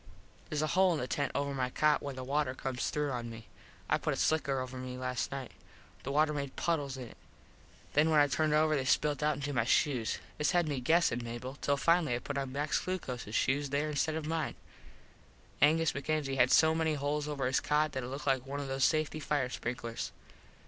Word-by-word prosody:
Theres 150 0 -1
a - - +1
hole 185 0 +4
in - - -2
the 125 - -3
tent 145 +2 -1
over 140 0 -1
my 130 -2 -1
cot 150 +3 +2
where 140 -2 -5
the 130 - -5
water 140 0 0
comes 130 -1 -2
through 150 -1 -1
on 120 -2 -3
me. 115 -1 -9 0.4
I - - +2
put - - -1
a - - -7
slicker 140 -4 +1
over 130 0 -5
me 125 0 -6
last 125 -2 -2
nite. 135 -2 -5 0.5
The 135 - -4
water 150 +1 +3
made 140 -2 -4
puddles 145 -5 -1
in 125 -2 -6
it. - - -16 0.8
Then 150 +2 +4
when 155 -2 +5
I 145 - +7
turned 150 +3 +1
over 155 0 +3
they 135 - 0
spilt 145 +3 +1
out 150 0 +2
into 145 +1 -4
my 120 -3 +2
shoes. 125 -1 +1 0.2
This 150 -2 +2
had 175 -2 +3
me 145 -3 -1
guessin 130 -3 +2
Mable 120 +2 -6
till 140 0 +1
finally 165 -4 +3
I - - 0
put 140 +2 -3
Max 145 +3 -1
Glucoses 125 - -4
shoes 140 +2 +1
there 145 +2 0
instead 155 +2 0
of 160 -1 -3
mine. 160 -5 -2 1.1
Angus 160 +2 +4
MacKenzie 140 -1 -1
had 125 -1 +5
so 160 +3 +5
many 160 -1 +1
holes 145 +1 -1
over 145 -3 -2
his 130 +1 +2
cot 150 +1 +1
that 130 - -3
it 120 - -5
looked 140 +3 -6
like 135 -2 +2
one 140 +1 -4
of 140 - -4
those 135 0 -1
safety 155 0 +2
fire 145 -4 0
sprinklers. 115 -1 -4
140 Hz, 220 wpm, -32 LUFS, 130-150 Hz, 1.1 s, I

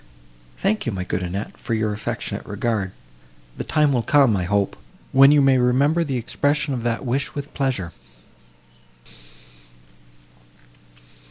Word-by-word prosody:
"Thank 210 - 0
you, - - +1
my 95 -3 -3
good 95 0 -3
Annette, 90 +4 -4
for 115 - -3
your 110 -1 0
affectionate 105 0 -4
regard; 105 -2 -2 0.6
the - - -4
time 150 -3 +2
will 125 - +2
come, 135 -3 +4
I 90 -2 -1
hope, 100 +1 0 0.4
when 135 +1 +7
you 145 -1 +5
may 135 -1 +4
remember 140 +7 +3
the 135 -5 -2
expression 145 +5 0
of 125 - -3
that 120 +2 -2
wish 135 +3 -2
with 145 0 -6
pleasure." 130 -11 -1
125 Hz, 140 wpm, -22 LUFS, 105-140 Hz, 0.6 s, when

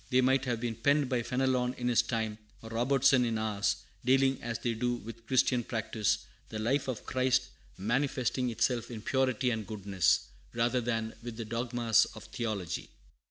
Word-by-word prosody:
They 130 -1 +4
might 130 +1 +3
have 120 -3 -1
been 115 -2 -3
penned 140 +3 +2
by 125 -3 +1
Fenelon 125 0 0
in 120 - -3
his 120 -2 +4
time, 110 -2 -2 0.2
or 110 - -9
Robertson 130 +2 +4
in 115 -2 0
ours, 105 -2 0 0.3
dealing 135 +1 +3
as 115 -1 -3
they 120 -1 -1
do 120 +2 0
with 115 -1 -10
Christian 125 -2 +3
practice, 110 -2 -1 0.2
the 110 - -5
life 130 +7 0
of 130 -4 -4
Christ 130 0 +1 0.3
manifesting 125 +3 0
itself 120 +1 0
in 110 -3 -7
purity 130 -1 +1
and 110 -3 -3
goodness, 100 -4 +2 0.3
rather 120 +2 +1
than 115 -1 -2
with 115 -1 -7
the 115 - -4
dogmas 115 0 +2
of - - -9
theology. 105 -8 -4
120 Hz, 170 wpm, -31 LUFS, 110-130 Hz, 0.3 s, They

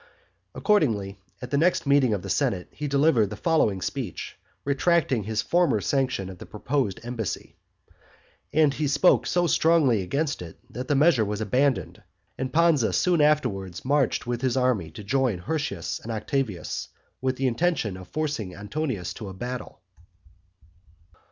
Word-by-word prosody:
Accordingly, 105 - +1 0.2
at 125 - -7
the 140 - +2
next 175 +1 +2
meeting 140 -3 +4
of 100 -4 -1
the 100 - -6
senate, 90 0 0
he 150 - -5
delivered 140 -7 +3
the 105 - -6
following 105 - +1
speech, 130 - -4 0.3
retracting 140 - +2
his 110 0 -1
former 175 0 +2
sanction 130 -8 0
of 95 -2 -9
the - - -10
proposed 110 -2 -2
embassy. 115 -5 -5 1.0
And 150 -2 +4
he 150 +1 -1
spoke 145 +6 +4
so 175 0 +2
strongly 155 - +3
against 140 - -2
it, 85 -2 -9
that 125 +1 -5
the 145 - +2
measure 145 -4 +4
was 105 0 -3
abandoned 105 - 0 0.3
and 130 0 -4
Pansa 160 -5 +3
soon 175 -3 +3
afterwards 100 - +1
marched 140 -2 +1
with 120 0 -3
his 130 -1 0
army 125 -10 +1
to 90 +7 -10
join 125 -1 +1
Hirtius 100 - -3
and 115 - -7
Octavius, 110 -2 -2 0.3
with 130 0 0
the 135 - -2
intention 130 - 0
of 95 -1 -10
forcing 145 -9 -3
Antonius 105 - -3
to 105 -4 -7
a 95 - -9
battle. 125 +5 -6
130 Hz, 155 wpm, -25 LUFS, 105-150 Hz, 1.0 s, meeting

